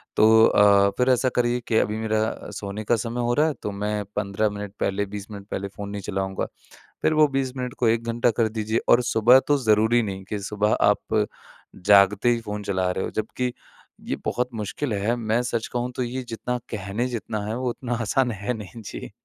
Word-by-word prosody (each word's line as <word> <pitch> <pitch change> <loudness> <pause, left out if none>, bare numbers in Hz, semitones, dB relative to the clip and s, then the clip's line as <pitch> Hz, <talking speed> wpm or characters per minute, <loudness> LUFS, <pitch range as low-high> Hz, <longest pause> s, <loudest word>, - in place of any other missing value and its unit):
तो 110 +1 +6
अ, 100 -1 +5
फ़िर 125 +1 +2
ऐसा 130 0 +3
करिए 120 0 +2
कि 110 - +2
अभी 105 0 +1
मेरा 110 0 -1
सोने 100 +1 -5
का 120 - +2
समय 115 +2 -3
हो 120 0 +1
रहा 150 +4 +3
है 155 - 0
तो 105 - -2
मैं 105 +1 -2
15 105 +1 0
मिनट 105 -1 -7
पहले 100 +1 0
20 100 0 -7
मिनट 100 -1 -9
पहले 100 +1 -3
फ़ोन 100 +1 -8
नहीं 100 0 -5
चलाऊँगा। 95 -1 -2 0.6
फ़िर - - +3
वो 155 -1 +5
20 135 -2 -1
मिनट 125 -1 -4
को 120 - +3
1 115 +1 +1
घंटा 115 +1 +1
कर 110 - +3
दीजिए 110 +1 -1
और 120 - +6
सुबह 120 +2 +5
तो 145 - +4
ज़रूरी 110 +2 +4
नहीं 95 -3 -5
कि 105 - -3
सुबह 105 0 +1
आप - - +2 0.6
जागते 100 +3 +5
ही 120 - +1
फ़ोन 105 -2 -5
चला 95 -2 0
रहे 95 - -2
हो - - -3
जबकि 125 +3 -2 0.5
ये - - -1
बहुत 125 0 -1
मुश्किल 110 +4 -3
है। 105 +4 0
मैं 115 +1 0
सच 115 -2 -2
कहूँ 125 0 -1
तो - - -1
ये 125 +2 -3
जितना 120 +2 -3
कहने 105 +3 -2
जितना 110 -3 -4
है 110 +2 -3
वो 125 -1 -1
उतना 120 0 -4
आसान 125 +3 +1
है 105 +2 -3
नहीं। 110 +1 -9
जी। 100 - -8
110 Hz, 210 wpm, -24 LUFS, 105-120 Hz, 0.6 s, तो